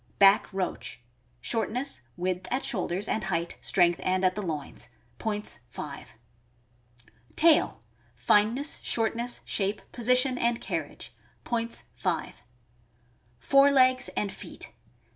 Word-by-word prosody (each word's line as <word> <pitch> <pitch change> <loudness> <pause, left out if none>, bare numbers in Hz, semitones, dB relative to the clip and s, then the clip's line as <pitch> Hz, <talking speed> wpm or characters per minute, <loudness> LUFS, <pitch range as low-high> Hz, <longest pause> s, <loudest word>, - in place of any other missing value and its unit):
Back 195 +1 +6
roach. 185 - -4 0.2
— 120 0 -38
Shortness, 245 - -1 0.2
width 185 +1 -2
at 260 - 0
shoulders, 190 -1 -1
and 215 -3 -1
height, 170 -2 -2
strength, 175 -2 +3
and 185 0 +1
at 185 - +3
the 210 - -4
loins. 150 -8 -4 0.3
Points, 210 -1 -1
5. 140 +2 -8 1.2
Tail. 325 -1 +4 0.2
— - - -35
Fineness, 230 +8 +3
shortness, 235 +2 -1
shape, 200 0 -1
position, 250 +2 +3
and 235 0 +1
carriage. - - -5 0.3
Points, 230 -1 -1
5. 170 -9 -3 1.0
Fore 275 - +5
legs 255 -2 +5
and 205 -2 0
feet. - - -7
210 Hz, 120 wpm, -28 LUFS, 180-245 Hz, 1.2 s, Back